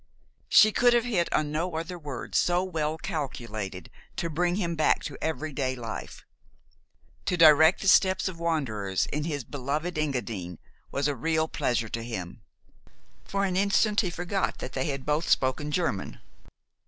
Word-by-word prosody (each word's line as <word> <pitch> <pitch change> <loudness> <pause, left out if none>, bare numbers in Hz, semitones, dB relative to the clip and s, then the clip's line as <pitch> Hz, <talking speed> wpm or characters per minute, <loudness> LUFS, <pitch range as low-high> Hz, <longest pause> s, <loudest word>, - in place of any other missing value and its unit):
She 215 - +7
could 245 +3 +4
have 240 - +3
hit 190 -8 0
on 150 -1 0
no 165 +3 -2
other 175 +2 -4
words 140 -6 -7
so 175 +1 +2
well 160 -4 -2
calculated 115 - -5 0.2
to 170 - -3
bring 175 +3 +1
him 175 -4 -1
back 155 - +2
to - - -5
every 155 -1 -3
day 130 -1 -1
life. 115 -3 -7 1.0
To 180 - 0
direct 160 +1 +7
the - - -2
steps 190 -1 +4
of 180 -3 -6
wanderers 115 - -1
in 150 +1 -1
his 145 -5 -3
beloved 150 +6 -3
Engadine 110 - -3 0.3
was 140 +1 0
a 145 - -1
real 160 +5 0
pleasure 120 -6 -1
to 115 - -4
him. 100 -4 -6 0.8
For 200 0 -1
an 185 -2 -1
instant 205 +2 +3
he 185 - -2
forgot 175 +3 -2
that 130 - -7
they 130 - -1
had 140 -3 -3
both 150 +3 0
spoken 130 +3 +1
German. 150 - -2
155 Hz, 165 wpm, -27 LUFS, 130-175 Hz, 1.0 s, She